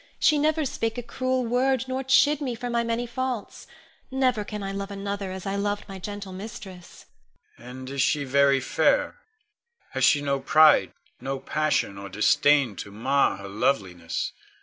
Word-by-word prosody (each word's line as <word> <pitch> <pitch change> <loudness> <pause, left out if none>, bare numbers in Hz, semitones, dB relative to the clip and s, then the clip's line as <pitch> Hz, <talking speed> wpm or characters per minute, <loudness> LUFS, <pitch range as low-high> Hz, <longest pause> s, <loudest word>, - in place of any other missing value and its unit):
She 300 -2 +3
never 310 +1 +1
spake 225 -3 -2
a 245 - -4
cruel 255 +1 -1
word, 255 +2 +1
nor 260 +1 -2
chid 285 +3 +4
me 255 -4 -2
for 240 +1 -5
my 235 0 +1
many 230 +1 -1
faults. 250 -2 -4 0.4
Never 255 -5 +1
can 210 0 -6
I 195 - -3
love 195 0 -5
another 200 -1 -4
as 190 -1 -7
I 195 0 -2
loved 205 +1 -2
my 195 -2 -8
gentle 200 0 -7
mistress. 190 -2 -10 0.5
Con. 120 - -15
And 130 +1 -8
is 140 -1 -1
she 145 +3 +2
very 140 0 +3
fair? - - +1 0.7
Has - - -2
she 145 - +5
no 140 -1 0
pride, 155 +3 +5 0.3
no 135 +2 -3
passion 145 -9 -1
or 100 0 -8
disdain 130 +4 +3
to - - -6
mar 130 +6 +1
her 100 0 -9
loveliness? 95 -5 -1
195 Hz, 170 wpm, -25 LUFS, -, 0.7 s, she